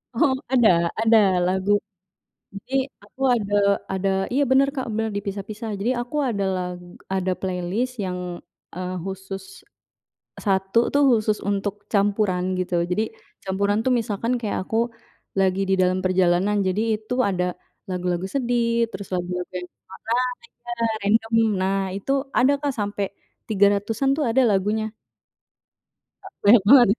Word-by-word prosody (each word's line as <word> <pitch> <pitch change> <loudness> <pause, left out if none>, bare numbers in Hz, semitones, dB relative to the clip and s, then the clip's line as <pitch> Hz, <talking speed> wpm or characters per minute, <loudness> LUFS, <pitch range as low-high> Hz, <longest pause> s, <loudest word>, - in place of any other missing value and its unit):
Oh, 260 +3 +3 0.2
ada 180 -10 +4
ada 225 0 +5 0.3
lagu 190 +2 0 0.8
jadi 255 +6 -1 0.2
aku 210 +6 -17
ada 205 -3 -3 0.4
ada 195 0 0 0.2
iya 275 - +2
bener 270 +1 +4
Kak, 260 - -2
benar 220 0 -1
dipisah-pisah 205 +2 -5
jadi 230 +5 +1
aku 245 +5 -7
ada 200 -3 -1
lag 180 -1 -4 0.3
ada 185 -1 0
playlist 190 +7 -2
yang, 180 -1 -3 0.6
eee, 185 0 -4
khusus, 195 0 -7 0.7
1 195 +2 +1
tuh 285 - +4
khusus 215 -3 +2
untuk 200 0 -1 0.2
campuran 200 -2 +2 0.2
gitu 175 -1 0
jadi 215 +5 +1 0.4
campuran 200 +2 0
tuh - - +3
misalkan 225 +2 -2
kayak 215 -3 -2
aku, 225 - 0 0.6
lagi 190 0 +2
di 195 - +4
dalam 185 0 +2
perjalanan. 185 +2 +2
Jadi 190 +3 0 0.2
itu 215 +3 -6 0.2
ada, 180 -1 0 0.4
lagu-lagu 180 0 -1
sedih 235 0 0
terus 195 0 -7
lagu-lagu 180 0 -3
yang 180 0 -6 0.4
nah 245 +2 +2 0.3
iya 240 0 -7 0.3
random 225 +3 +1 0.3
nah 190 +1 +1 0.2
itu 200 +7 -3 0.3
ada 260 +3 +5
Kak 285 -2 -1
sampai, 205 0 -1 0.4
300-an 205 +5 +2
tuh 305 - +1
ada 265 +4 +3
lagunya. 210 +3 0 1.5
Banyak 205 0 +7
banget 255 -3 +9
ya 205 - +2
205 Hz, 135 wpm, -23 LUFS, 190-230 Hz, 1.5 s, banget